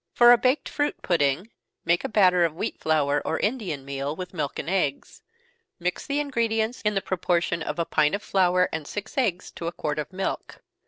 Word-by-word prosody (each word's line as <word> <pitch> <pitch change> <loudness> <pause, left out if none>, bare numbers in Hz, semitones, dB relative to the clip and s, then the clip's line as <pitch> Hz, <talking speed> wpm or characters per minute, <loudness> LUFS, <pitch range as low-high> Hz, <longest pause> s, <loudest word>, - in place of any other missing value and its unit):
For 240 0 +8
a 245 - +8
baked 255 +4 +1
fruit 290 0 -1
pudding, 165 +5 +1 0.3
make 170 +1 +2
a - - -2
batter 185 -4 +4
of 165 -2 0
wheat 210 +6 -3
flour, 145 -2 +1
or 160 - -1
Indian 200 - -2
meal, 140 +2 -3
with 180 +2 -7
milk 150 -5 -3
and - - -5
eggs. 175 -7 -1 0.6
Mix 175 0 -3
the 285 +1 0
ingredients 230 -4 0
in 210 -1 0
the 195 - 0
proportion 175 -2 0
of - - -3
a 170 - 0
pint 150 +2 +2
of 205 - -6
flour 180 -1 +3
and 155 -2 -4
six 205 +5 -6
eggs 210 - 0
to 170 - -6
a - - -1
quart 150 -3 -3
of 150 - -4
milk. 190 +1 -4
180 Hz, 205 wpm, -25 LUFS, 155-215 Hz, 0.6 s, For